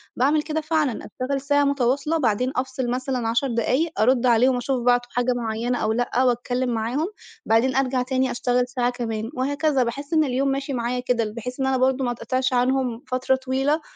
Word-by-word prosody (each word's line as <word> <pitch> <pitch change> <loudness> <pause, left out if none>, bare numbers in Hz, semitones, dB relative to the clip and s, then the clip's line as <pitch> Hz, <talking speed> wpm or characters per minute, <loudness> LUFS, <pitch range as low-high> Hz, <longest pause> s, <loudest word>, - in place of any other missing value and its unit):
باعمل 290 +5 +2
كده 315 0 -2
فعلًا، 310 -6 0
أشتغل 270 +1 -3
ساعة 285 +1 +2
مُتواصلة 280 +3 +1
بعدين 250 -1 +1
أفصل 260 -1 -2
مثلًا 250 -1 -2
10 235 +4 +1
دقايق، 255 +7 0
أرُدّ 250 +2 +3
عليهم 250 +2 +4
أشُوف 245 0 -1
بعتوا 245 0 +2
حاجة 245 +1 +1
مُعيّنة 235 +1 -2
أو 215 0 0
لأ، 245 +2 0
واتكلّم 245 +1 0
معاهم، 240 +9 -1 0.4
بعدين 235 +3 +2
أرجع 260 -1 +1
تاني 260 0 0
أشتغل 245 0 0
ساعة 245 -1 0
كمان، 225 -3 -4
وهكذا. 285 +1 +1
باحِسّ 280 +6 -5
إن 310 -1 +4
اليوم 270 0 0
ماشي 275 +1 -2
معايا 245 +1 -1
كده، 245 -2 0
ال 210 - -5
بحيث 250 +4 -6
إن 265 - +1
أنا 265 -1 +2
برضه 260 0 +1
ما 245 - 0
اتقِطِعش 255 +2 -1
عنهم 250 -1 0
فترة 255 +1 +2
طويلة، 270 +4 0
255 Hz, 190 wpm, -23 LUFS, 245-270 Hz, 0.4 s, عليهم